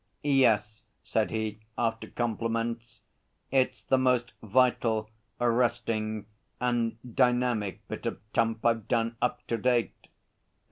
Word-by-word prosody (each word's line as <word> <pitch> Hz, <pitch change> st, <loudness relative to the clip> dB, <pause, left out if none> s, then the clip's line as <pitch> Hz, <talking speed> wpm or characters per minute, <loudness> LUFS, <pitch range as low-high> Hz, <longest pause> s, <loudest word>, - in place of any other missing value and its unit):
'Yes,' 110 Hz, -7 st, +3 dB, 0.2 s
said 110 Hz, -1 st, 0 dB
he, 110 Hz, -1 st, -3 dB, 0.2 s
after 115 Hz, -1 st, -1 dB
compliments. 115 Hz, 0 st, -2 dB, 0.5 s
'It's 130 Hz, -1 st, +1 dB
the 130 Hz, -, +2 dB
most 125 Hz, -2 st, +2 dB
vital, 110 Hz, -1 st, +2 dB, 0.3 s
arresting 115 Hz, -3 st, 0 dB, 0.3 s
and 120 Hz, -2 st, 0 dB, 0.2 s
dynamic 120 Hz, -5 st, +1 dB
bit -, -, -5 dB
of -, -, -3 dB
tump 115 Hz, -1 st, +1 dB
I've 115 Hz, -2 st, +2 dB
done 115 Hz, -1 st, +1 dB
up 125 Hz, 0 st, -1 dB
to 115 Hz, -, -1 dB
date. 120 Hz, 0 st, 0 dB
115 Hz, 110 wpm, -29 LUFS, 110-125 Hz, 0.5 s, Yes